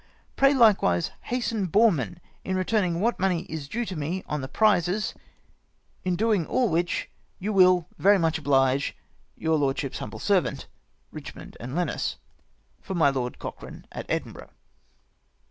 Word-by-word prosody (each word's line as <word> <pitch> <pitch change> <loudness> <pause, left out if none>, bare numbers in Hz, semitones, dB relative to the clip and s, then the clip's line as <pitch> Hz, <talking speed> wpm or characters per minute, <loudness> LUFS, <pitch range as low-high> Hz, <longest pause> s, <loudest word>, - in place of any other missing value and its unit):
Pray, 275 0 +5
likewise 195 - +4
hasten 230 -5 -1
Boreman 180 - +2 0.3
in 190 - -2
re 185 - +1
turning 185 -5 0
what 235 +2 +1
money 180 -3 +1
is 155 -3 -6
due 235 +9 -2
to 190 - -5
me 165 +5 -3
on 150 -1 -3
the 130 - -4
prizes, 210 +2 +2 0.9
in 185 -1 0
doing 210 -2 +2
all 250 -3 +1
which, 170 +1 0 0.3
you 210 +3 -3
will 185 -3 +5
very 200 +1 +5
much 165 -3 +1
oblige 135 -2 +2 0.2
" - - -38
Your 160 -1 +1
lordship's 135 -2 -1
humble - - -6
servant, - - 0 0.5
"EiCHMOND - - -9
and 125 +4 -6
Lenos. 180 0 -1 0.6
'• - - -34
For 190 - -4
my 155 -5 +4
Lord 125 -2 -3
Cochrane, - - -9
at - - -7
Edinburgh." - - -4
180 Hz, 155 wpm, -26 LUFS, 150-205 Hz, 0.9 s, Pray